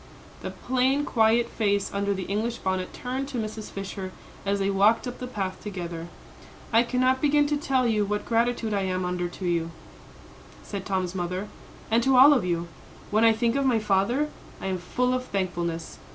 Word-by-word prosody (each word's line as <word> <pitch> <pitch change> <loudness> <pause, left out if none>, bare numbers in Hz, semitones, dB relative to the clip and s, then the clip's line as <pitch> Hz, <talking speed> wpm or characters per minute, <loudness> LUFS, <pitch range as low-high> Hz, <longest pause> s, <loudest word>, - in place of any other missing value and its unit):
The - - -4
plain, 260 +3 +1
quiet 230 +1 +3
face 205 -4 0
under 200 0 0
the 190 - -3
English 220 +5 -2
bonnet 185 -1 -2
turned 260 +2 -4
to 275 -3 -5
Mrs. 215 -1 -4
Fisher 195 -1 -6 0.4
as 200 0 +2
they 195 0 0
walked 205 +5 +4
up 245 - -6
the 250 - -5
path 195 -6 -4
together. 175 -4 -5 0.7
"I 230 - +7
cannot 255 +2 +1
begin 295 0 +4
to 295 +1 +1
tell 270 -3 +1
you 215 -3 +2
what 210 +1 -2
gratitude 230 -1 +1
I 200 - +1
am 185 -1 -1
under 180 0 -1
to 180 +2 -7
you," 170 -1 0 0.9
said 200 -2 -6
Tom's 185 -2 -1
mother, 185 +2 -3 0.4
"and 230 +1 +4
to 265 +2 +3
all 280 +4 +9
of 250 -8 +2
you. 170 -1 -1 0.4
When 215 +2 +3
I 225 - +7
think 230 +2 +1
of 275 - +2
my 245 -3 +3
father, 215 +8 +1 0.3
I - - -7
am 190 -1 -1
full 250 +8 0
of 255 0 -1
thankfulness. 175 -5 -3
210 Hz, 190 wpm, -26 LUFS, 190-250 Hz, 0.9 s, all